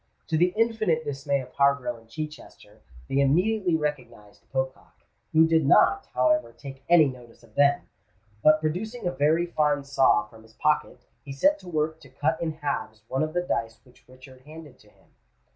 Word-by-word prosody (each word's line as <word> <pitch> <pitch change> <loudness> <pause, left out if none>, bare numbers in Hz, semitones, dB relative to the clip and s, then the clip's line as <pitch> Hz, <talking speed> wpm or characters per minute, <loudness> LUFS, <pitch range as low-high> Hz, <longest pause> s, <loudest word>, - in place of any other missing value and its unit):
To 160 - 0
the 175 +3 +3
infinite 220 -8 +1
dismay 140 0 -2
of 125 0 -12
Harborough 140 -4 +1
and 115 0 -20
Chichester, 150 -7 -9 0.3
they 135 - 0
immediately 180 +6 +2
recognised 130 -9 -5
Pocock, 130 0 -5 0.3
who 160 +1 +5
did 160 -1 +3
not, 395 - +4
however, 310 0 +2
take 135 -1 -11
any 170 -3 +7
notice 120 -3 -11
of 115 -2 -21
them: 140 +3 +3 0.6
but 155 0 +6
producing 200 +9 -4
a 175 - +1
very 155 +5 +2
fine 150 -4 0
saw 135 -5 +3
from 110 +1 -17
his 110 0 -20
pocket, 150 +4 -1 0.2
he 140 - -9
set 290 - +2
to 180 - -12
work 160 -1 -1
to 135 - -17
cut 155 +5 -1
in 160 -2 -2
halves 140 -8 -5
one 130 - -1
of 155 0 -2
the 175 - +1
dice 115 -9 -3
which 125 -1 -24
Richard 130 0 -16
handed 150 -2 -13
to 105 - -22
him. - - -28
145 Hz, 180 wpm, -26 LUFS, 130-160 Hz, 0.6 s, any